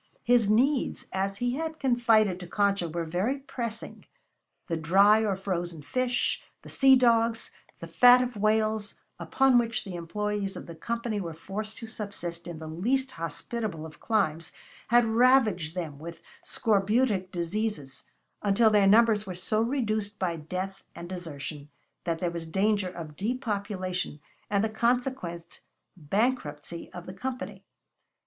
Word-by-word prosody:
His 240 -4 +4
needs, 260 +6 +2
as 195 +1 -1
he 245 +2 0
had 320 0 -4
confided 230 -7 +3
to 180 - -8
Concha, 200 -2 +1
were 170 +1 -3
very 185 - -1
pressing. 235 -5 -6 0.6
The 170 - -2
dry 195 +7 +5
or 205 -3 +1
frozen 175 -4 -4
fish, 250 - 0 0.2
the - - -11
sea 270 -1 +6
dogs, 230 -2 +2 0.3
the - - -8
fat 250 0 +6
of 250 -1 -4
whales, 215 0 +1 0.2
upon 265 -2 +4
which 230 -1 -1
the 190 - -7
employees 200 +3 -3
of - - -7
the 170 - -9
Company 230 +4 -3
were 165 -3 -5
forced 210 +6 -6
to 230 - -7
subsist 175 -6 -5
in 170 -2 -6
the 160 - -8
least 250 +12 0
hospitable 165 - -4
of 155 - -12
climes, 165 -7 0 0.4
had 240 +1 +5
ravaged 220 - +3
them 155 -6 -5
with 165 +1 -8 0.2
scorbutic 210 -2 +1
diseases 175 -5 -3 0.4
until 210 +2 +4
their 205 -2 +5
numbers 215 0 +5
were 185 - -5
so 215 +4 0
reduced 220 -5 -1
by 180 -4 -1
death 185 +5 -5
and 170 - -8
desertion 150 -5 -7 0.4
that 165 -2 0
there 175 +1 -1
was 170 -1 -6
danger 195 +2 +1
of 165 -4 -8
depopulation 200 - -3 0.3
and 200 0 +2
the - - +2
consequent 235 -7 -2 0.3
bankruptcy 170 - -2
of 175 -1 -9
the 185 - -8
Company. 255 +6 -5
205 Hz, 145 wpm, -28 LUFS, 175-230 Hz, 0.6 s, sea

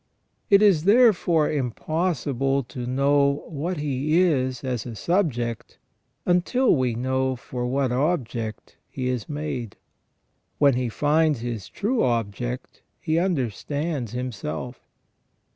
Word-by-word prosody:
It 200 +1 +6
is, 180 -6 +4
therefore, 200 -8 +4
im 135 -5 0
possible 140 -2 -1
to 120 0 -7
know 140 +2 +2
what 165 +4 -3
he 145 +2 0
is 130 -8 +1
as 125 -4 -2
a 115 - -6
subject 120 - -1 0.5
until 185 +9 +3
we 125 -4 0
know 130 +2 0
for 125 0 -5
what 130 0 0
object 125 -6 -2
he 130 -1 -3
is 125 -4 -3
made. 145 -7 -4 0.8
When 140 -2 +5
he 125 0 -1
finds 150 +1 +2
his 115 -5 -5
true 225 +5 -1
object, 120 +1 -2 0.2
he 160 +1 0
under 165 - 0
stands 145 - -3
himself. 120 -3 -5
135 Hz, 125 wpm, -24 LUFS, 125-160 Hz, 0.8 s, It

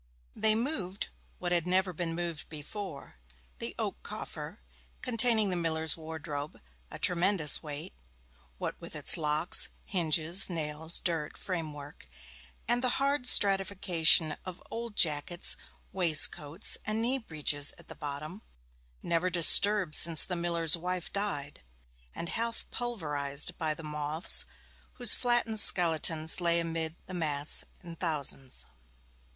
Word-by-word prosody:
They 215 0 +2
moved 220 - -4 0.3
what 175 -1 -6
had 175 -1 -2
never 185 0 0
been 165 0 -6
moved 170 -3 -6
before 155 - -10 0.4
the - - -6
oak - - -6
coffer, - - -9 0.4
containing 230 -4 +2
the - - -1
miller's 160 -2 0
wardrobe 155 -2 -8 0.3
a - - -10
tremendous 175 -3 +4
weight, 150 - -8 0.6
what - - -7
with - - -11
its - - +3
locks, 150 +2 +1 0.2
hinges, 170 0 +1
nails, 160 -1 -2
dirt, 165 -4 -4
framework, 150 - -7 0.6
and 240 +2 0
the 250 - -2
hard 275 -1 -1
stratification 185 -7 +4
of 185 -2 -9
old 230 -2 -7
jackets, 160 +1 +2 0.4
waistcoats, 165 -1 +1
and 215 +1 -4
knee 250 +4 -2
breeches 150 - +2
at 170 - -15
the - - -8
bottom, 150 +7 -8 0.6
never 170 +2 -2
disturbed 185 +1 +5
since 165 -2 +5
the 180 - -5
miller's 170 -2 +1
wife 180 +1 -6
died, 145 -8 -5 0.5
and 170 - -6
half 230 0 -2
pulverized 150 - -2
by 155 -2 -2
the 165 - -11
moths, 150 +2 0 0.5
whose 245 -4 +5
flattened 240 -3 +1
skeletons 165 -3 +3
lay 170 0 +2
amid 165 -1 -3
the 185 - -11
mass 150 -4 +4 0.2
in 170 -1 -10
thousands. 145 -6 0
170 Hz, 125 wpm, -28 LUFS, 155-195 Hz, 0.6 s, disturbed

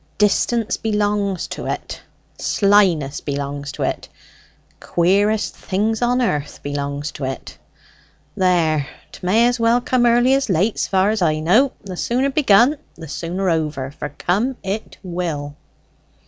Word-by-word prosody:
Distance 215 +2 +1
belongs 205 -3 0
to - - -6
it, - - -5 0.4
slyness 185 -9 +2
belongs 140 0 -4
to - - -4
it, - - -3 0.7
queerest 200 +5 +1
things 215 +4 -1
on 245 +1 +2
earth 150 -10 -2
belongs 145 0 -3
to 140 - -8
it! 135 0 -6 0.8
There, 165 -6 +2 0.2
'tmay 210 +6 +2
as 245 0 0
well 230 +1 +3
come 245 0 +2
early 240 +2 +4
as 270 -3 +1
late 195 +5 +1
s'far 190 +2 +2
as 215 -2 -2
I 155 -3 +2
know. 220 - +3
The 190 -2 -7
sooner 260 +7 0
begun, 260 0 +4 0.2
the 165 -1 -10
sooner 175 +6 -3
over; 150 -4 -2
for 145 - -6
come 210 - -1
it 200 +3 -4
will." 165 -5 -4
190 Hz, 135 wpm, -20 LUFS, 155-225 Hz, 0.8 s, early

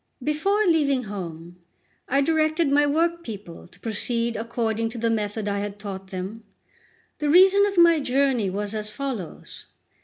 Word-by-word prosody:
LXXIX 250 - -11
BEFORE 400 +7 +1
leaving 290 -7 +2
home, 175 -4 -8 0.5
I 275 +2 +2
directed 310 0 +1
my 290 +1 +4
workpeople 290 - -2
to - - -16
proceed 230 +1 -1
according 225 0 -2
to 235 - -9
the 230 0 0
method 210 -1 -2
I 200 0 -1
had 205 0 -5
taught 195 -2 -7
them. 190 +4 -6 0.8
The 300 -1 0
reason 385 +5 +6
of 400 -2 -4
my 340 -2 +6
journey 265 -6 +1
was 205 +2 -3
as 215 -1 -3
follows. 235 - -6
235 Hz, 155 wpm, -24 LUFS, 205-305 Hz, 0.8 s, reason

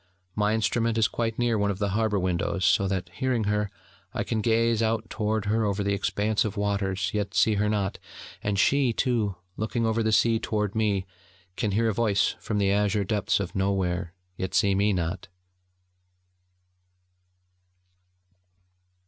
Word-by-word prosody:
My 105 +1 +2
instrument 115 +1 0
is 110 -1 +4
quite 115 -1 -2
near 120 -3 +1
one 100 0 +1
of 100 - -2
the 100 0 -1
harbour 105 +1 +1
windows, 90 0 -1
so 95 +3 +3
that, 95 -2 -2
hearing 125 -1 0
her, 105 0 0 0.5
I - - 0
can 110 - -1
gaze 115 0 +2
out 110 0 0
toward 110 -1 -1
her 110 +2 +1
over 100 -1 0
the 100 0 0
expanse 105 +2 0
of 105 -2 -4
waters, 100 -2 -1
yet 105 -1 -2
see 110 - +4
her 105 +1 +1
not; 100 -2 -1 0.4
and 100 -1 -1
she, 135 +4 +3
too, 115 -6 0 0.2
looking 115 +2 -1
over 115 0 +1
the 110 0 +1
sea 115 +1 +3
toward 105 -3 -1
me, 105 -4 0 0.5
can 110 - -1
hear 115 +3 +2
a - - 0
voice 100 -2 +1
from 105 - -3
the 100 -1 +2
azure 105 0 +1
depths 100 +1 0
of 100 -3 -4
nowhere, 95 -3 -1 0.2
yet 95 - -3
see 100 -1 +3
me 100 +2 +2
not. 90 -1 -2
105 Hz, 165 wpm, -26 LUFS, 100-110 Hz, 0.5 s, is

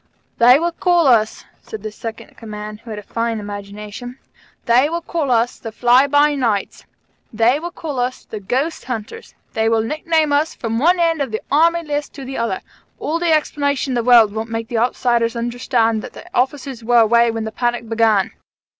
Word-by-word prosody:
"They 245 +2 +7
will 340 +3 0
call 345 -1 +2
us," 225 -5 +2 0.2
said 215 -2 -9
the 215 - -4
Second 225 +1 -8
in - - -23
Command, 210 -1 -8
who 230 - -14
had 215 - -5
really 210 - -10
a - - -27
fine 230 -1 -1
imagination, 205 +4 -8 0.5
"they 250 +5 +4
will 340 +1 -3
call 325 -5 -2
us 235 0 +1
the 225 - -7
'Fly 245 +4 +4
by 290 +1 +3
Nights'; 230 -8 -2 0.5
they 230 +5 +2
will 345 +2 -5
call 300 -6 -6
us 250 +1 -3
the 215 - -7
'Ghost 265 - -2
Hunters'; 250 - -7 0.2
they 220 0 +1
will 225 -1 +2
nickname 310 +3 0
us 300 +3 +1
from 230 -1 -3
one 350 +6 +3
end 330 -3 +2
of 275 - -1
the 220 0 -4
Army 335 +3 +3
list 295 -1 -3
to 275 -2 -9
the 265 +1 -6
other. 230 -5 -2 0.4
All 330 +2 -2
the 345 -1 +1
explanations 285 -3 0
in - - -1
the 240 -1 0
world 230 -4 +6
won't 220 +1 -4
make 225 0 -4
outsiders 235 0 +1
understand 235 -1 0
that - - -9
the - - -11
officers 260 -1 -1
were 240 +1 +4
away 235 +1 +4
when 225 -1 -3
the 220 - -4
panic 240 0 -2
began. 220 -3 +2
240 Hz, 200 wpm, -19 LUFS, 225-290 Hz, 0.5 s, They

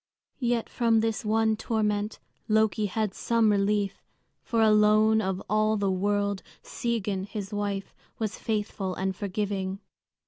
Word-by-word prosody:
Yet 240 -3 0
from 230 -2 +2
this 225 0 -1
one 220 0 +2
torment 210 -1 -1 0.3
Loki 215 0 +2
had 210 0 -1
some 230 -1 +2
relief; 200 0 +1 0.4
for 230 - -1
alone 215 0 +5
of 190 -2 -2
all 215 +1 +2
the 200 -1 +1
world 200 +1 0 0.2
Sigyn, 210 -5 -2
his 205 -1 -6
wife, 205 -1 -3 0.2
was 220 -2 -3
faithful 205 -4 -2
and 190 0 -2
forgiving. 195 -1 -2
210 Hz, 130 wpm, -27 LUFS, 200-220 Hz, 0.4 s, alone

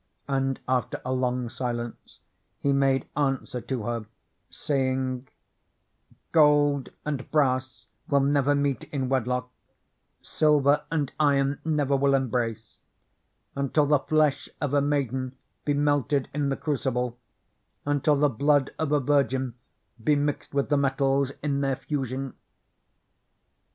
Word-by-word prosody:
And 135 -1 0
after 125 -1 0
a 130 - -1
long 125 -1 0
silence, 120 -1 -5 0.4
he 140 - +1
made 135 -1 +2
answer 135 -3 -1
to 125 -2 -3
her, 115 -1 -3 0.4
saying, 130 -2 -1 1.0
"Gold 145 -3 +4 0.2
and 145 -4 -3
brass 130 -5 0 0.2
will 140 -1 +4
never 140 0 +2
meet 140 -3 0
in 135 -3 -3
wedlock, 125 -1 -1 0.7
silver 150 -2 +3
and 150 -4 -1
iron 140 -1 +2
never 145 -3 +1
will 140 0 +3
embrace, 115 -4 -2 0.8
until 140 +2 +2
the 145 0 +4
flesh 155 -1 +1
of 145 -2 -2
a 145 - +4
maiden 130 -2 -1 0.3
be 145 - +1
melted 145 -1 +1
in 145 -1 0
the 135 - -1
crucible; 125 -5 -2 0.7
until 145 +1 +2
the 145 +1 +3
blood 140 +2 +2
of 160 -2 -1
a 150 - +4
virgin 130 -2 +1 0.5
be 150 +5 +4
mixed 145 0 -2
with 140 -1 +1
the 145 - +3
metals 135 0 +1
in 140 -2 0
their 135 -1 +1
fusion." 135 -1 -4
135 Hz, 125 wpm, -26 LUFS, 130-145 Hz, 1.0 s, Gold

